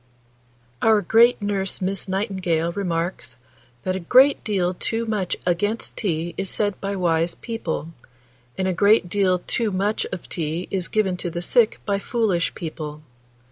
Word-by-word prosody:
Our 220 -2 +4
great 230 +6 +5
nurse 195 -2 -1
Miss 195 +1 -2
Nightingale 185 -4 -1
remarks, 170 -8 -3 0.5
that 185 0 -1
"a - - -2
great 255 +10 +5
deal 185 -4 0
too 225 +5 -2
much 210 -5 -1
against 205 +6 0
tea 170 -4 -2
is 195 -1 -1
said 205 -2 0
by 200 0 -2
wise 170 -2 +1
people, 175 -9 -4 0.7
and 190 - 0
a 185 - +1
great 200 -1 +4
deal 190 -1 +2
too 230 -2 0
much 205 +3 -1
of 180 - -6
tea 165 +1 -3
is 185 -2 -1
given 195 -4 0
to 175 - -3
the 170 - -4
sick 230 +3 +3
by 200 -1 0
foolish 205 -7 0
people. 155 -2 -6
190 Hz, 155 wpm, -23 LUFS, 175-210 Hz, 0.7 s, great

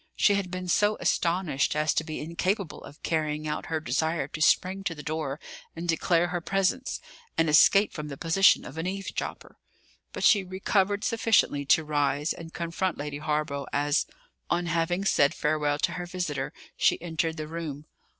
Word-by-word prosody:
She 205 - +4
had 200 -2 -1
been 185 0 -5
so 205 +4 +2
astonished 170 -6 +1
as 150 0 +2
to - - 0
be 155 -1 -5
incapable 175 +3 -2
of 145 - -13
carrying 155 -1 -1
out 150 - -3
her 160 -1 -1
desire 155 +1 -1
to 155 - -7
spring 190 +4 +3
to 170 - -1
the 150 - -9
door 155 -2 -3 0.4
and 170 +1 -5
declare 170 +1 +2
her 175 -1 -2
presence, 195 +8 0 0.4
and 165 - +3
escape 195 +7 +5
from 150 -1 -5
the 140 -2 -7
position 175 +6 +4
of 145 +5 -8
an 165 - -2
eavesdropper; 195 +1 -5 0.5
but - - -5
she 205 -4 +5
recovered 195 +2 0
sufficiently 220 -11 +2
to 155 +3 +4
rise 145 0 0
and 165 -1 -10
confront 170 +2 -2
Lady 145 0 -5
Hawborough 150 -2 -2
as, 145 +1 +1 0.4
on 175 0 +1
having 175 +3 0
said 145 -4 +3
farewell 150 -1 0
to 170 - 0
her 175 0 -5
visitor, 160 -7 -3 0.2
she - - +3
entered 165 -1 -2
the 155 -1 -4
room. 155 -3 -6
165 Hz, 175 wpm, -27 LUFS, 150-185 Hz, 0.5 s, escape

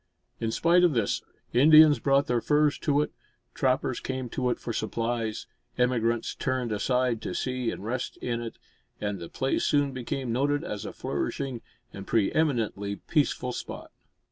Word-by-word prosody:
In 115 - -1
spite 170 +9 +3
of 175 -4 +4
this, 115 -5 0 0.3
Indians 155 +3 +7
brought 140 0 +3
their 120 -1 0
furs 150 +1 +2
to 145 0 +2
it; - - -6 0.4
trappers 130 -1 0
came 130 -2 -4
to 125 +1 -1
it - - 0
for 115 - -5
supplies; 115 0 -2 0.3
emigrants 120 -2 +1
turned 130 -3 -2
aside 125 +2 +1
to - - -4
see 125 -2 -1
and 100 - -6
rest 125 +3 -3
in 120 -1 -3
it; 115 -1 -7 0.4
and 105 -2 -3
the 85 - -8
place 135 - -1
soon 145 -2 +2
became 130 0 -3
noted 145 +4 +1
as 105 -2 -5
a - - -5
flourishing 130 -4 -3 0.3
and 100 -1 -8
pre 110 -4 +2
eminently 115 -10 0
peaceful 140 -1 0
spot. - - -7
125 Hz, 165 wpm, -27 LUFS, 115-140 Hz, 0.4 s, Indians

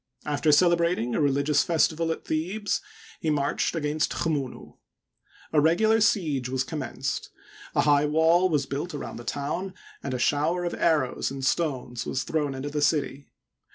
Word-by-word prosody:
After 150 +1 +1
celebrating 170 -6 +3
a - - +1
religious 140 +1 +2
festival 165 0 +1
at - - -5
Thebes 185 +7 -1 0.4
he 160 - -1
marched 145 +2 0
against 155 0 -1
Chmunu, 145 -6 -3 0.8
A 150 - +5
regular 220 +8 +3
siege 155 - +1
was 130 0 0
commenced; 130 - -4 0.5
a - - +4
high 145 0 +4
wall 165 +4 +4
was 145 -4 +1
built 145 +5 -4
around 145 - -6
the 120 - -8
town 165 +9 -3 0.3
and 135 -2 -3
a - - -1
shower 155 +7 +1
of 175 - -2
arrows 150 -7 +1
and 135 0 -5
stones 130 -6 -1
was 130 - -1
thrown 145 -2 -1
into 140 +2 -5
the 150 0 -2
city. 145 -2 0
150 Hz, 155 wpm, -26 LUFS, 140-170 Hz, 0.8 s, A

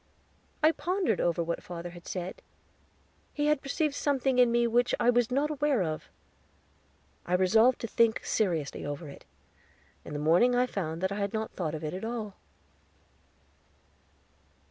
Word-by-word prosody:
I 310 - +7
pondered 355 - -1
over 170 0 +1
what 170 0 -3
father 175 0 -7
had 175 0 -13
said; 180 0 -5 0.9
he 295 - 0
had 300 -2 +2
perceived 295 +2 -1
something 270 -3 +1
in 245 -1 +5
me 235 0 +3
which 240 +1 +2
I 245 - +4
was 245 -1 +2
not 280 +4 0
aware 290 -7 +1
of. 155 -2 -4 1.1
I 180 - 0
resolved 220 +7 +4
to 230 - -3
think 230 0 +2
seriously 170 -9 -1
over 145 +2 -5
it; 140 - -13 0.8
in - - -8
the - - -2
morning 170 +12 +4
I 250 +1 +3
found 170 -7 -4
I 190 +1 0
had 200 -1 -2
not 220 0 -2
thought 160 -4 -3
of 155 - -7
it 155 - -3
at 185 - -6
all. 225 -3 -4
220 Hz, 160 wpm, -29 LUFS, 175-250 Hz, 1.1 s, I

